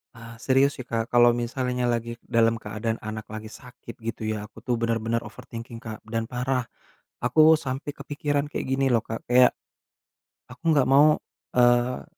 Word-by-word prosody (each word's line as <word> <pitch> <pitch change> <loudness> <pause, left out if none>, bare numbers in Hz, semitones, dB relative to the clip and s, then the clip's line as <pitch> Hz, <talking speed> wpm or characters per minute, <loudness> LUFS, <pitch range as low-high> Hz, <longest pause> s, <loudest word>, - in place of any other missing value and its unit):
Eee, 115 -1 -11
serius 135 +1 +4
sih 130 - -7
Kak, 115 -1 -2
kalau 120 0 +5
misalnya 125 +1 -1
lagi 115 0 -2 0.2
dalam 115 0 +3
keadaan 110 +1 -3
anak 110 0 -6
lagi 110 0 -6
sakit 125 0 -12
gitu 110 -1 -3
ya, 110 -1 -2
aku 105 +1 -12
tuh 125 +1 -1
bener-bener 115 0 -1
overthinking 115 0 -9
Kak, 110 -2 -8
dan 115 0 -3
parah. 125 0 -1 0.6
Aku 155 +6 +6
sampai 135 +3 -3
kepikiran 145 0 -2
kayak - - -3
gini 135 0 +2
loh 115 - +4
Kak, 110 -1 -6
kayak, 125 0 +6 1.0
aku 125 - -14
gak 140 - +5
mau, 145 +3 +6 0.4
eee, 120 0 +3
120 Hz, 165 wpm, -25 LUFS, 115-130 Hz, 1.0 s, Aku